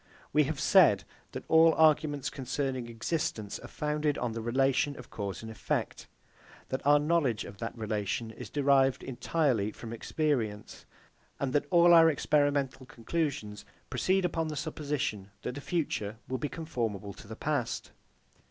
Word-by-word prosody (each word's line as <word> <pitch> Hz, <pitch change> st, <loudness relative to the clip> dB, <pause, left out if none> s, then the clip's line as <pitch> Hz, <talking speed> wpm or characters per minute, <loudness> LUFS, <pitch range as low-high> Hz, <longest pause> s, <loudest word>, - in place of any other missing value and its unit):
We 150 Hz, 0 st, +4 dB
have 145 Hz, 0 st, -3 dB
said 155 Hz, -, +5 dB, 0.3 s
that -, -, -6 dB
all 160 Hz, 0 st, +6 dB
arguments 150 Hz, -3 st, +3 dB
concerning 130 Hz, -2 st, -3 dB
existence 115 Hz, -3 st, -3 dB
are -, -, -10 dB
founded 150 Hz, -1 st, -1 dB
on 120 Hz, -1 st, -2 dB
the 115 Hz, 0 st, -4 dB
relation 135 Hz, +4 st, +1 dB
of 125 Hz, -, -12 dB
cause 100 Hz, 0 st, -5 dB
and 110 Hz, -, -7 dB
effect; 110 Hz, -, -3 dB, 0.6 s
that 130 Hz, -, -3 dB
our 145 Hz, 0 st, +7 dB
knowledge 145 Hz, -7 st, +1 dB
of 100 Hz, -, -11 dB
that 115 Hz, +1 st, -5 dB
relation 110 Hz, +1 st, -2 dB
is -, -, -9 dB
derived 135 Hz, -2 st, +3 dB
entirely 130 Hz, -4 st, 0 dB
from 115 Hz, +1 st, -8 dB
experience; 115 Hz, -5 st, -2 dB, 0.5 s
and 135 Hz, -2 st, -1 dB
that 145 Hz, 0 st, +1 dB
all 175 Hz, 0 st, +6 dB
our 165 Hz, -1 st, +8 dB
experimental 145 Hz, -3 st, +1 dB
conclusions 130 Hz, -4 st, -3 dB, 0.3 s
proceed 185 Hz, +9 st, +1 dB
upon 165 Hz, -2 st, -1 dB
the 155 Hz, -, -4 dB
supposition 145 Hz, -9 st, -3 dB
that -, -, -3 dB
the 145 Hz, -, -7 dB
future 115 Hz, -11 st, -2 dB
will 130 Hz, 0 st, -3 dB
be 150 Hz, -, -2 dB
conformable 115 Hz, -, -4 dB
to -, -, -14 dB
the 110 Hz, -, -7 dB
past. 130 Hz, -3 st, -2 dB
135 Hz, 150 wpm, -30 LUFS, 115-150 Hz, 0.6 s, our